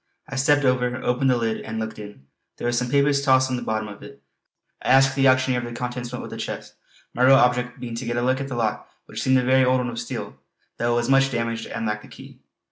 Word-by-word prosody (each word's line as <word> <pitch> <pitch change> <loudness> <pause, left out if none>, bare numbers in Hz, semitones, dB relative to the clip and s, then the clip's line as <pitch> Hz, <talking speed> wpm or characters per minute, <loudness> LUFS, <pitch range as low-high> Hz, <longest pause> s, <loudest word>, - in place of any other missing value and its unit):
I 135 - -7
stepped 145 +1 +3
over, 125 -1 +1
opened 125 +2 +1
the 125 - +3
lid 115 -1 -2
and 110 0 -6
looked 110 -1 -5
in; 105 -10 -11 0.3
there - - -6
were 120 - +1
some 120 +1 -1
papers 140 +1 +3
tossed 130 -2 +3
on - - 0
the 125 - -4
bottom 110 -2 -2
of 100 -1 -11
it. 140 0 -12 0.6
I - - -6
asked 135 +1 +5
the 135 0 +3
auctioneer 130 -1 +3
if 120 - -5
the 120 - -8
contents 125 0 -4
went 125 - -5
with - - -9
the - - -6
chest, - - -6 0.4
my 125 - -3
real 130 +1 +7
object 125 -1 +2
being 120 -2 -6
to 120 +2 -5
get 120 0 -2
a 120 - 0
look 130 +2 +1
at 135 - -4
the 130 - -5
lock 115 -3 -2 0.2
which - - -6
seemed 130 0 +3
a 130 - +1
very 130 +1 +4
old 130 0 +3
one 125 -1 -2
of 115 - -6
steel, 115 - -6 0.4
though 120 0 0
it - - +1
was 120 0 0
much 135 0 +4
damaged 115 -2 -3
and - - -4
lacked 105 0 -3
a - - -14
key. - - -14
125 Hz, 275 wpm, -23 LUFS, 120-130 Hz, 0.6 s, real